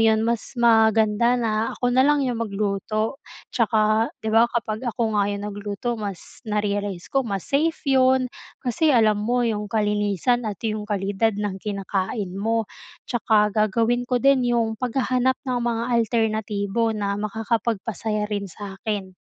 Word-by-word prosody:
'yon, 220 -1 +4
mas 235 +2 -2
maganda 225 0 +4
na 220 -2 0
ako - - -5
na 255 - +4
lang 285 +1 +3
'yong 245 -3 -2
magluto. 215 +5 -2 0.3
'Tsaka, 220 -1 +2 0.2
'di 220 - -1
ba, 230 +1 +5
kapag 220 -2 -2
ako 235 +1 -2 0.2
nga 200 - +1
'yong 205 0 -3
nagluto 205 +3 -5
mas, 200 -4 -7
na-realize 205 -3 -2
ko 270 -3 +1
mas 195 -3 -3
safe 315 +4 0
'yon 260 -1 +4 0.4
kasi 255 +6 +1
alam 220 -6 +4
mo 240 +3 +1
'yong 210 -2 -2
kalinisan 210 +2 0
at 205 - -4
'yong 215 -1 -2
kalidad 205 +1 0
ng 200 -2 -3
kinakain 195 -1 -3
mo. 225 +1 +1 0.4
'Tsaka 215 -3 +2
gagawin 230 +4 +1
ko 250 - +2
din 260 -1 +3
'yong 225 -2 0
paghahanap 255 +1 +1
ng 250 -2 -1
mga 235 -1 -1
alternatibo 220 -2 0
na 200 0 -2
makakapagpasaya 215 -1 -2
rin 200 -1 -2
sa 195 +2 -9
'kin. 205 -4 -3
220 Hz, 150 wpm, -23 LUFS, 205-240 Hz, 0.4 s, ba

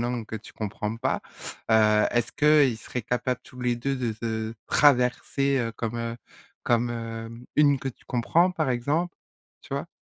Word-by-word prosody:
langue 120 -2 -2
que 110 - -5
tu 110 - -12
comprends 105 +1 -4
pas. 130 +3 -1 0.5
Heu, 105 -1 +5
est-ce 120 -1 0
qu'ils 145 -6 +4
seraient 125 +1 -5
capables 125 +2 -1
tous 125 - -12
les 120 -1 +1
2 135 +3 -1
de 120 -3 -1
se 110 0 -3
traverser, 135 0 +3
heu, 115 -2 -1
comme, 115 0 -4
heu, 115 0 -3 0.5
comme, 120 0 +2
hem, 115 0 -6
une 145 -2 +5
que 135 - -3
tu 125 - -11
comprends, 160 +9 +2
par 155 -6 -1
exemple? 145 +8 0 0.5
Tu - - -6
vois? - - -3
120 Hz, 175 wpm, -26 LUFS, 115-135 Hz, 0.5 s, Heu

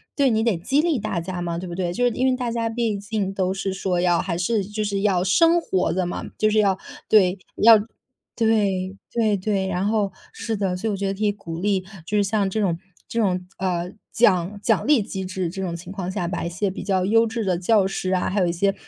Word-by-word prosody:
对， 280 -2 +3
你 220 -1 +1
得 230 -6 +2
激 265 - +1
励 315 -5 +2
大 205 -4 -2
家 175 +1 -5
嘛， 170 -1 -2
对 180 +2 -5
不 175 - -6
对， 175 -1 -2
就 245 +8 0
是 245 - +3
因 255 +4 0
为 255 - +2
大 245 -2 -2
家 230 -1 -1
毕 225 -2 -1
竟 205 -2 -2
都 185 -1 0
是 195 0 -3
说 190 -2 -1
要 175 -1 +3
还 175 -3 -2
是 205 +4 0
就 210 +2 -3
是 200 -1 -1
要 190 -3 +2
生 330 - +4
活 190 - 0
的 185 +1 0
嘛， 175 - -4
就 215 0 +2
是 215 - +3
要 195 -3 +3 0.3
对， 195 -3 +4 0.2
要 225 0 +8 0.6
对， 200 -4 +1 0.2
对 220 -3 +2
对， 195 0 -1
然 185 0 -1
后 210 -3 0 0.2
是 225 -1 -4
的， 190 -3 -1
所 220 +5 -3
以 - - +1
我 - - -1
觉 195 0 -2
得 195 - -1
可 215 - +1
以 205 - +3
鼓 170 -5 -7
励， 195 0 +1 0.2
就 210 - -3
是 205 - +4
像 200 0 +1
这 215 +2 -1
种 175 -4 +1 0.3
这 235 - -2
种， 185 -4 +1
呃， 180 -1 -2 0.2
奖 200 -3 +2
奖 225 +3 +2
励 295 -6 +5
机 190 -1 -5
制， 185 -2 -3
这 190 +2 -6
种 175 -3 -3
情 175 +2 -9
况 190 -2 -4
下 185 -3 -2
把 180 - -3
一 170 - -2
些 185 +3 -1
比 190 - -6
较 190 -2 +1
优 225 +3 +4
质 225 0 -3
的 185 -2 +1
教 195 +3 +3
师 190 -1 -3
啊， 185 -1 +1
还 200 - 0
有 180 - +3
一 - - +1
些 195 +3 +1
195 Hz, 275 characters per minute, -23 LUFS, 185-220 Hz, 0.6 s, 要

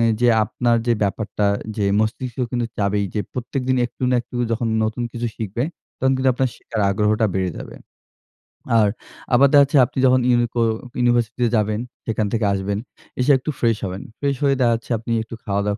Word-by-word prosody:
এ - - +3 0.2
যে 120 - +4 0.2
আপনার 120 +2 +1
যে 120 - +4
ব্যাপারটা 105 +1 -1 0.3
যে 105 - 0 0.2
মস্তিষ্ক 120 +3 -2
কিন্তু 120 -2 -1
চাইবেই 100 0 +1
যে 105 - 0
প্রত্যেকদিন 130 +1 -2
একটু 120 - -14
না - - +3
একটু 125 - -9 0.2
যখন 115 0 -1 0.2
নতুন 110 +2 -2
কিছু 120 0 -3
শিখবে 110 +1 -3 0.4
তখন 130 +1 +2
কিন্তু 130 0 +1
আপনার 130 +1 +1
শেখার 110 -2 -5
আগ্রহটা 105 +2 +2
বেড়ে 95 -1 0
যাবে। - - -9 1.1
আর 105 - +4 0.5
আবার 135 +3 +6
দেখাচ্ছে 140 0 +6
আপনি - - -11
যখন 130 0 +5
ইউনিকো 120 -1 +2 0.4
ইউনিভার্সিটি 120 -1 +1
তে - - +4
যাবেন 105 0 0 0.3
সেখান 110 -1 0
থেকে 115 -2 +1
আসবেন, 100 +1 -2 0.4
এসে 125 +3 +4
একটু 130 - -6
ফ্রেশ 115 -2 +2
হবেন। 95 0 -5 0.2
ফ্রেশ 140 -1 0
হয়ে 140 -1 +3
দেখাচ্ছে 115 -2 +1
আপনি 115 +2 -6
একটু 115 - -9
খাওয়া-দাওয়া 100 0 -1
115 Hz, 180 wpm, -21 LUFS, 105-125 Hz, 1.1 s, আবার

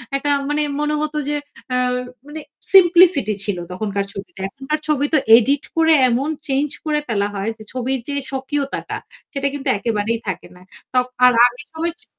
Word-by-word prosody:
একটা 275 +1 -1 0.2
মানে 295 +1 +1 0.2
মনে 300 0 0
হতো 305 0 -2
যে 295 - 0 0.4
আ - - +2 0.5
মানে 305 +2 -7 0.3
সিমপ্লিসিটি 350 - +6
ছিল 200 -2 -1
তখনকার 200 +1 -2
ছবিতে। 195 -1 -9
এখনকার 270 +8 -4
ছবি 290 -2 +1
তো - - +6 0.2
এডিট 275 +4 +2
করে 325 0 +4 0.2
এমন 255 +5 0 0.2
চেঞ্জ 280 +2 0 0.2
করে 300 -1 +1
ফেলা 205 -4 0
হয় 200 +2 -2
যে 215 - -11
ছবির 260 +1 -2
যে 285 - -3 0.2
স্বকীয়তাটা 275 +1 -3 0.4
সেটা 280 0 0
কিন্তু 285 0 -5
একেবারেই 225 +1 -1
থাকে 185 -2 -4
না। 180 - -17 0.3
ত - - -57 0.3
আর 250 - +7
আগের 245 +3 -2
সময় 330 +1 -2
ছিল - - -29
270 Hz, 170 wpm, -20 LUFS, 225-300 Hz, 0.5 s, আর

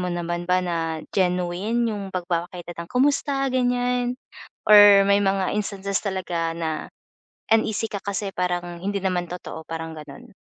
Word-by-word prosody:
mo 180 - -2
naman 175 0 -3
ba 180 0 +3
na 165 -2 -2
genuine 185 +5 0
yung 200 -2 -5
pagpapakita 175 -1 -3
ng, - - -19
kumusta 275 +1 +1
gan'yan 245 -1 +1 0.5
or 205 -1 +9
may 200 0 +4
mga 195 -1 +1
instances 200 -1 -2
talaga 175 -4 -2
na 160 -2 -3 0.6
uneasy 220 -1 +2
ka 200 - -4
kasi 200 0 -3
parang 175 -1 -2
hindi 200 +2 -2
naman 180 -2 -1
totoo, 175 -2 -7
parang 165 0 -5
gano'n? 150 - -11
190 Hz, 145 wpm, -24 LUFS, 175-210 Hz, 0.6 s, or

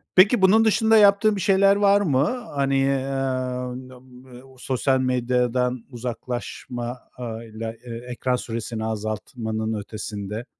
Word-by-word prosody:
Peki, 200 +4 +6
bunun 215 +4 +5
dışında 220 +1 +4
yaptığın 205 +1 +5
bir 195 - -3
şeyler 195 +2 +4
var 200 0 +4
mı? 180 - 0
Hani, 135 -1 +1
emm, 130 -2 -2
b - - -13 0.5
bu - - -17
ııı, 130 - -19
sosyal 130 +1 0
medyadan 125 -1 0
uzaklaşmayla, 120 -2 -6
e 120 -2 -8 0.2
ekran 125 +1 -1
süresini 115 -2 -4
azaltmanın 110 +1 -3
ötesinde. 105 +1 -6
125 Hz, 120 wpm, -23 LUFS, 115-150 Hz, 0.5 s, Peki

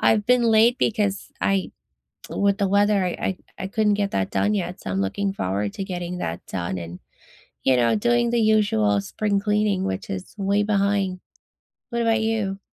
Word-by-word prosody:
I've 210 -2 +3
been 250 0 +4
late 230 +1 +4
because 205 -3 0
I 195 -1 +1 0.6
with 200 +1 +1
the 200 - +2
weather, 200 0 +3
I 180 - 0
I 190 - -2 0.3
I - - -2
couldn't 210 +1 +1
get 200 -1 -1
that 95 -1 -1
done 210 +1 +1
yet. 180 -2 -3
So 95 - -5
I'm 95 +1 0
looking 195 - -1
forward 100 - -2
to 195 - -4
getting 180 -1 -5
that 85 +1 -4
done 90 0 -3
and, 85 +1 -7 0.6
you 130 -1 +3
know, 120 -1 +3
doing 240 +2 +2
the 235 -1 +2
usual 200 - +3
spring 200 - -1
cleaning, 210 -2 +1
which 95 0 -4
is 95 -1 -6
way 200 +1 +1
behind. 200 -2 0 0.7
What 235 - -2
about 225 -1 +2
you? 215 -3 -1
200 Hz, 185 wpm, -23 LUFS, 135-215 Hz, 0.7 s, been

